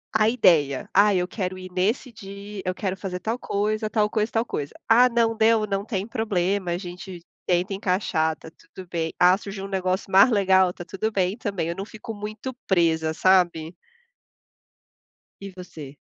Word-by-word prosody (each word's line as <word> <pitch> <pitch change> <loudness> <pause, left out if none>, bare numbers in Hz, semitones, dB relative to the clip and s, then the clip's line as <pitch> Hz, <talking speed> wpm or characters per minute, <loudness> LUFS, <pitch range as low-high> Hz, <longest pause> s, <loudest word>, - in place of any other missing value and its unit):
a 220 0 +4
ideia. 155 - +3
Ah, 205 0 +5
eu 180 -1 0
quero 185 -2 -4
ir 185 0 -9
nesse 215 +8 -1
dia, 200 -1 -9
eu 185 -1 -2
quero 190 -2 -2
fazer 185 -1 -5
tal 225 +6 -3
coisa, 215 +1 -1
tal 215 -1 +2
coisa, 215 +1 -1
tal 225 +1 0
coisa. 145 -9 -4 0.2
Ah, 245 +3 +6
não 230 -1 +1
deu, 220 -1 +3
não 195 -1 -2
tem 205 -2 -3
problema. 200 -4 -1
A 170 - -1
gente 180 0 -8 0.3
tenta 180 +2 +1
encaixar, 180 -5 0
tá 160 - -13 0.2
tudo 185 -1 -9
bem. 165 -1 -2
Ah, 180 +1 +6
surgiu 195 -1 -7
um - - -6
negócio 190 0 -2
mais 195 +6 +7
legal, 190 -4 +3
tá 175 - -10
tudo 220 +5 -3
bem 190 -1 0
também. 200 -7 -3
Eu 170 - -3
não 195 - -5
fico 220 +2 -9
muito 215 +5 -6
presa, 160 -4 +2
sabe? 175 -2 +2 1.7
E 195 0 -7
você? 160 -6 -10
195 Hz, 180 wpm, -24 LUFS, 180-215 Hz, 1.7 s, mais